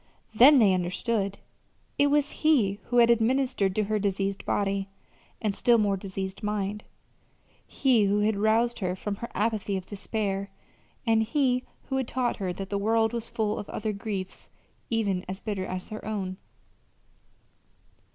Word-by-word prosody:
Then 265 +7 +8
they 210 -6 +5
understood. 195 +3 -1 0.6
It 285 - +5
was 290 0 +2
he 230 -11 +3
who 245 - -1
had 235 0 +7
administered 235 -4 +1
to 215 - +2
her 215 +1 0
diseased 195 0 -1
body, 195 -1 0 0.5
and 210 -2 -1
still 235 +3 +4
more 205 -2 +2
diseased 190 0 -5
mind; 210 0 -2 0.8
he 245 -6 +3
who 205 +1 +2
had 215 +1 +2
roused 225 +3 +2
her 185 -3 -1
from 200 +1 -4
her 235 - -6
apathy 210 -2 0
of 185 - -6
despair; 200 -1 -3 0.6
and 225 -1 +3
he 250 +1 +1 0.2
who 265 - 0
had 260 -3 -1
taught 250 -1 -1
her 190 -3 -2
that 195 +2 -6
the 200 - 0
world 225 +2 +2
was 235 -1 -4
full 215 -1 -1
of 205 - -7
other 215 0 -3
griefs 200 -2 -5 0.4
even 200 -5 0
as 190 +1 -5
bitter 200 -3 -3
as 185 0 -5
her 215 - -7
own. 195 -3 -3
210 Hz, 160 wpm, -27 LUFS, 195-230 Hz, 0.8 s, Then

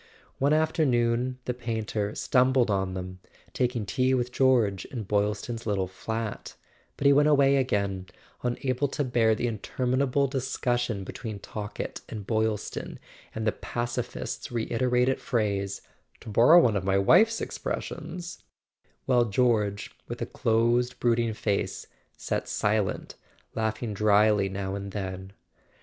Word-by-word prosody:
One 140 +2 +2
afternoon 130 -6 +2
the 125 - -1
painter 110 -3 -3
stumbled 130 -3 +3
on 95 -1 -1
them, 90 0 -6 0.3
taking 125 -3 0
tea 130 +5 +1
with 125 -1 -1
George 120 -8 +2
in 120 -5 -6
Boylston's 105 +3 -1
little 100 -3 +1
flat; 110 +4 -5 0.4
but - - -4
he 140 - +7
went 145 +1 +5
away 140 -2 +5
again, 100 -7 -1 0.3
unable 130 +2 -1
to 145 - -2
bear 120 -4 +2
the 120 - -2
interminable 130 +4 0
discussion 120 -5 -1
between 110 +2 -6
Talkett 105 +1 -6
and 105 -3 -6
Boyl 110 0 +1
ston, - - -7 0.4
and 110 0 -3
the 110 - +3
pacifist's 120 +2 -4
reiterated 125 +2 +1
phrase: 100 -4 -1 0.4
"To - - -9
borrow 120 +11 +7
one 115 -10 +3
of 100 - -1
my 95 0 +2
wife's 220 - +5
expressions"—while 165 -7 -4
George, 105 -2 +1 0.2
with - - -6
a - - -2
closed 120 +2 +1
brooding 115 -2 +1
face, 100 -2 -2 0.3
sat - - -3
silent, 105 -2 -1 0.4
laughing 110 0 -2
drily 105 -1 +3
now 95 0 -4
and 100 -1 -5
then. 95 -1 -5
115 Hz, 130 wpm, -27 LUFS, 105-125 Hz, 0.4 s, he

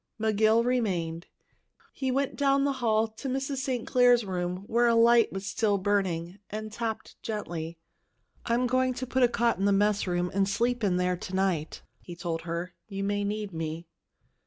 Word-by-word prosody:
McGill 220 +1 +3
remained. 180 -9 -1 0.7
He 265 - -2
went 270 +1 0
down 275 -1 +2
the 280 - +2
hall 220 -1 +2
to 220 +5 -7
Mrs. 270 +1 -2
St. 255 -2 -2
Clair's 245 -2 +4
room, 180 0 -3
where 235 +3 +2
a 230 - +4
light 230 0 +5
was 195 0 -5
still 205 0 +1
burning, 190 -2 -1
and 215 +1 -5
tapped 225 -1 -5
gently. 170 -6 -4 0.7
"I'm 240 +1 +1
going 255 +1 +1
to 255 - -4
put 260 +1 0
a 245 - +7
cot 235 -3 +1
in 195 - +1
the 200 - +4
mess 205 0 +2
room 175 0 0
and 195 0 +1
sleep 235 +3 0
in 185 -3 +2
there 180 0 +1
to 185 +1 -6
night," 185 -5 -1 0.2
he 175 - -10
told 170 -1 -3
her. 170 +1 -3
"You 195 -2 -4
may 205 0 0
need 205 -1 -3
me." 160 +1 -4
210 Hz, 185 wpm, -28 LUFS, 180-240 Hz, 0.7 s, a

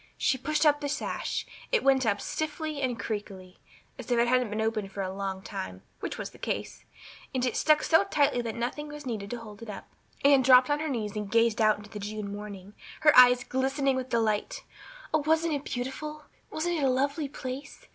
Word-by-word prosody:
She 260 -3 +1
pushed 305 +4 0
up 290 -1 +4
the 285 - -2
sash 295 +1 -2 0.3
it 485 - +2
went 265 -3 +4
up 205 -1 +2
stiffly 310 +1 -3
and 250 -3 -1
creakily, 195 -4 -6 0.4
as - - -8
if 245 - +2
it 235 +1 +3
hadn't 250 -2 +2
been 215 +1 -3
opened 220 -3 -1
for 195 0 -3
a 185 0 -4
long 195 -1 -4
time, 95 - -6 0.2
which - - -4
was - - -5
the - - -17
case; - - -4 0.5
and 255 -1 +1
it 250 - -1
stuck 305 -1 +3
so 320 +3 +5
tight 285 -9 +2
that 225 -2 -4
nothing 245 +6 -3
was 295 -1 -9
needed 215 -5 -4
to 240 - -4
hold 220 -2 -11
it 230 - -8
up. 205 - -7 0.4
Anne 280 -1 +7
dropped 255 +1 +6
on 290 - +2
her 310 0 -2
knees 220 -6 -3
and 210 -1 -4
gazed 230 0 +3
out 215 -1 +4
into 210 0 -13
the 210 - -6
June 205 0 -5
morning, 205 -1 -8 0.3
her 300 -1 +6
eyes 250 -1 +8
glistening 270 +1 0
with 260 0 -3
delight. 220 -3 0 0.5
Oh, 310 - +4
wasn't 320 +1 +2
it 285 -1 -3
beautiful? 300 +5 -5 0.3
Wasn't 345 +2 -1
it - - -1
a 270 - +4
lovely 280 +3 0
place? 265 +1 -7
250 Hz, 215 wpm, -28 LUFS, 215-290 Hz, 0.5 s, eyes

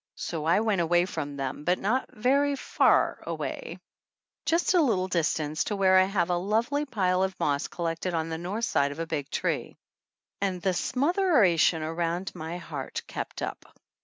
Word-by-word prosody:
So 160 -3 -4
I 170 +6 +4
went 215 -5 +1
away 175 +1 +3
from 145 -6 -5
them, 135 +1 -4
but 180 +3 +2
not 235 +7 0
very 280 +5 +2
far - - +2
away, - - -5 0.7
just 335 +3 +2
a 355 - +5
little 200 -10 +1
distance, 155 -3 0
to 210 - -2
where 190 -1 +5
I 185 - +5
have 185 -3 0
a 175 - +2
lovely 225 +10 0
pile 185 -7 +1
of 190 0 -1
moss 145 +1 0
collected 170 +1 -3
on 160 0 -1
the 160 0 -4
north 200 +7 -2
side 140 -9 +1
of 145 - -8
a 165 - -2
big 150 -4 -3
tree. - - -2 0.6
And 190 -2 0
the 190 +1 0
smotheration 255 - +3
around 170 +3 -2
my 160 +2 -5
heart 155 -6 -6
kept - - -5
up. - - -7
180 Hz, 175 wpm, -27 LUFS, 165-215 Hz, 0.7 s, a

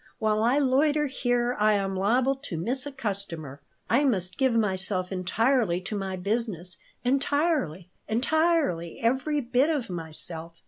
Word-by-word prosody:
While 215 0 +1
I 240 +5 +3
loiter 290 +2 +3
here 245 -2 0
I 215 0 +4
am 195 -1 0
liable 240 +8 +2
to 270 -11 -7
miss 250 - -1
a - - -5
customer. 190 - -4 0.3
I 255 +5 +3
must 190 -8 0
give 265 -1 +3
myself 190 -3 0
entirely 195 +1 +1
to 200 +3 -5
my 195 -2 -3
business, 190 -2 -2 0.3
entirely, 270 - 0 0.2
entirely 270 - +1
every 265 +5 +1
bit 250 +4 +2
of 275 - -1
myself. 165 0 -5
225 Hz, 140 wpm, -27 LUFS, 185-270 Hz, 0.3 s, I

